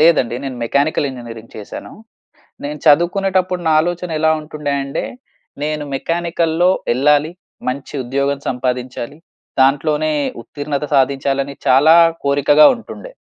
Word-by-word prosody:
లేదండి 150 Hz, -7 st, +4 dB
నేను 130 Hz, -2 st, -5 dB
mechanical 140 Hz, +4 st, +1 dB
engineering 115 Hz, -3 st, -10 dB
చేశాను. 105 Hz, -, -8 dB, 0.7 s
నేను 150 Hz, +1 st, -5 dB
చదువుకునేటప్పుడు 180 Hz, +3 st, +2 dB
నా -, -, +3 dB
ఆలోచన 175 Hz, +1 st, -3 dB
ఎలా 160 Hz, 0 st, +3 dB
ఉంటుండే 150 Hz, -2 st, -4 dB
అంటే 140 Hz, 0 st, -4 dB, 0.6 s
నేను 150 Hz, 0 st, -2 dB
మెకానికల్‌లో 170 Hz, +2 st, 0 dB, 0.2 s
ఎళ్ళాలి 150 Hz, +5 st, +2 dB, 0.4 s
మంచి 130 Hz, +1 st, -4 dB
ఉద్యోగం 140 Hz, +3 st, -1 dB
సంపాదించాలి. 125 Hz, +2 st, -3 dB, 0.4 s
దాంట్లోనే 150 Hz, +3 st, +2 dB, 0.3 s
ఉత్తీర్ణత 145 Hz, +3 st, -4 dB
సాధించాలని 135 Hz, +1 st, +1 dB
చాలా 140 Hz, +5 st, +6 dB, 0.3 s
కోరికగా 145 Hz, +2 st, +5 dB
ఉంటుండె. 245 Hz, -, -10 dB
145 Hz, 110 wpm, -18 LUFS, 135-160 Hz, 0.7 s, చాలా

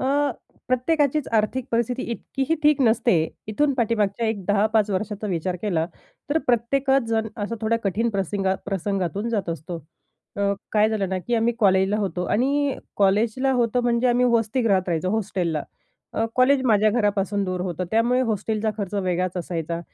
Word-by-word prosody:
अ, -, -, -2 dB, 0.6 s
प्रत्येकाचीच 285 Hz, +3 st, +1 dB
आर्थिक 225 Hz, +4 st, +1 dB
परिस्थिती 235 Hz, +2 st, 0 dB
इतकीही 270 Hz, +5 st, -2 dB
ठीक 300 Hz, -1 st, +4 dB
नसते. 230 Hz, -2 st, +3 dB, 0.3 s
इथून 280 Hz, +7 st, +1 dB
पाठीमागच्या 230 Hz, -2 st, 0 dB
एक 215 Hz, -4 st, -2 dB
10-5 210 Hz, +1 st, +2 dB
वर्षाचा 210 Hz, +2 st, -3 dB
विचार 180 Hz, -1 st, -2 dB
केला 170 Hz, -6 st, 0 dB, 0.4 s
तर 310 Hz, -, +3 dB
प्रत्येकजण 240 Hz, -2 st, +1 dB
असा 210 Hz, +3 st, -2 dB
थोड्या 230 Hz, +1 st, +1 dB
कठीण 210 Hz, +4 st, +1 dB
प्रसिंगा 195 Hz, -1 st, -1 dB
प्रसंगातून 195 Hz, +2 st, -2 dB
जात 205 Hz, -6 st, -2 dB
असतो. 165 Hz, +1 st, -5 dB, 0.6 s
अ, 200 Hz, 0 st, +1 dB, 0.2 s
काय 215 Hz, 0 st, +4 dB
झालं 210 Hz, -3 st, -1 dB
ना, 190 Hz, 0 st, -1 dB
की 240 Hz, +6 st, -2 dB
आम्ही 230 Hz, +1 st, +2 dB
कॉलेजला 190 Hz, -1 st, +3 dB
होतो 190 Hz, -3 st, -2 dB
आणि 275 Hz, +4 st, +1 dB, 0.2 s
कॉलेजला 215 Hz, +7 st, +2 dB
होतो 245 Hz, -1 st, +1 dB
म्हणजे 240 Hz, 0 st, +1 dB
आम्ही 245 Hz, +1 st, +3 dB
वसतीगृहात 225 Hz, -4 st, +1 dB
राहायचो, 175 Hz, +2 st, 0 dB
हॉस्टेलला. 180 Hz, -7 st, -1 dB, 0.5 s
अ, 225 Hz, -, 0 dB
कॉलेज 260 Hz, +1 st, +4 dB
माझ्या 215 Hz, -2 st, +4 dB
घरापासून 205 Hz, -2 st, 0 dB
दूर 185 Hz, -1 st, -3 dB
होतं. 180 Hz, -1 st, -3 dB
त्यामुळे 240 Hz, +3 st, +2 dB
हॉस्टेलचा 215 Hz, +1 st, -1 dB
खर्च 200 Hz, -1 st, -4 dB
वेगळाच 185 Hz, -2 st, -1 dB
असायचा, 170 Hz, -1 st, -3 dB
215 Hz, 150 wpm, -23 LUFS, 190-240 Hz, 0.6 s, ठीक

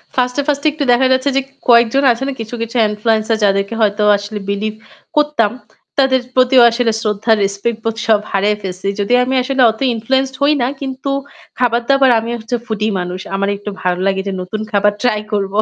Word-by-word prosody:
1st 250 Hz, -1 st, 0 dB
এ -, -, +3 dB
1st 285 Hz, 0 st, 0 dB
এ -, -, +6 dB
একটু 295 Hz, -1 st, -3 dB
দেখা 260 Hz, +2 st, +4 dB
যাচ্ছে 260 Hz, +2 st, +1 dB
যে -, -, +3 dB, 0.3 s
কয়েকজন 235 Hz, +3 st, +5 dB
আছে 240 Hz, +3 st, -3 dB
না? 275 Hz, -, -2 dB
কিছু, 225 Hz, +2 st, -5 dB
কিছু 230 Hz, +1 st, -5 dB
influencer 220 Hz, +1 st, 0 dB
যাদেরকে 200 Hz, +1 st, +1 dB
হয়তো 210 Hz, 0 st, +1 dB
আসলে 205 Hz, +1 st, -6 dB
believe 215 Hz, +2 st, -2 dB, 0.4 s
করতাম। 295 Hz, -8 st, +2 dB, 0.5 s
তাদের 265 Hz, -1 st, +3 dB, 0.2 s
প্রতিও 255 Hz, 0 st, +5 dB
আসলে 230 Hz, 0 st, 0 dB
শ্রদ্ধা, 215 Hz, +1 st, -1 dB
respect 200 Hz, +3 st, -2 dB
বোধ 225 Hz, -1 st, -2 dB
সব 220 Hz, -2 st, +4 dB
হারায়ে 205 Hz, +1 st, +1 dB
ফেলেছি। 190 Hz, 0 st, -5 dB
যদিও 245 Hz, +5 st, +2 dB
আমি 265 Hz, +1 st, -1 dB
আসলে 265 Hz, 0 st, 0 dB
অত 220 Hz, -, -13 dB, 0.2 s
influenced 265 Hz, +4 st, -1 dB
হই 290 Hz, +2 st, +4 dB
না। 240 Hz, -, +1 dB
কিন্তু 270 Hz, 0 st, -4 dB, 0.5 s
খাবার-দাবার, 250 Hz, +3 st, +3 dB
আমি 230 Hz, -, -6 dB
হচ্ছে 225 Hz, +3 st, -3 dB
foodie 215 Hz, -1 st, -2 dB
মানুষ। 180 Hz, +1 st, -4 dB, 0.2 s
আমার 200 Hz, +1 st, 0 dB
একটু 205 Hz, +1 st, -7 dB
ভালো 180 Hz, 0 st, -1 dB
লাগে 195 Hz, 0 st, 0 dB
যে -, -, -1 dB
নতুন 210 Hz, +4 st, -5 dB
খাবার 205 Hz, 0 st, +2 dB
ট্রাই 215 Hz, -4 st, +1 dB
করবো। 200 Hz, 0 st, -1 dB
225 Hz, 190 wpm, -16 LUFS, 205-255 Hz, 0.5 s, এ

